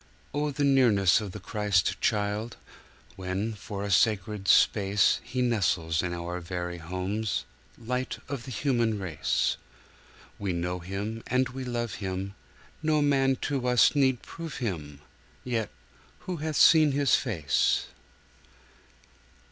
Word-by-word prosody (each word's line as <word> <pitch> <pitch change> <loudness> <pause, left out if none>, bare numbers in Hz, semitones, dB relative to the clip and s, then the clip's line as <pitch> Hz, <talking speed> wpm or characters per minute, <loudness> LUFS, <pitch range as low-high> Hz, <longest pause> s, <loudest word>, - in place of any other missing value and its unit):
Oh, 150 +1 0
the 145 0 -2
nearness 115 -9 +4
of 105 -3 -5
the 105 - -8
Christ 105 -2 0
Child, 105 +1 -1 0.6
When, 95 +4 -2
for 100 -1 -6
a 100 - -3
sacred 105 +1 +1
space, 100 0 +4
He 125 +1 -2
nestles 85 -8 +1
in 90 - -2
our 85 +1 -4
very 90 0 -5
homes— 95 - -3 0.3
Light 125 +2 -3
of 135 -4 -5
the - - -8
human 120 -3 +1
race! 90 -7 -1 0.8
We 100 -3 -2
know 90 +1 -2
him 100 +5 -5
and 130 +1 +1
we 130 +1 -6
love 120 -2 -3
him, 95 0 -3 0.5
No 155 -2 +2
man 135 -2 +3
to 135 -3 -1
us 125 -2 +5
need 130 -4 +2
prove 165 -2 -7
him— 75 - -4 0.4
Yet 115 -4 -2 0.5
who 180 -2 -4
hath 155 0 -3
seen 155 -2 +6
his 140 -1 +2
face? 85 - +1
105 Hz, 130 wpm, -28 LUFS, 95-130 Hz, 0.8 s, seen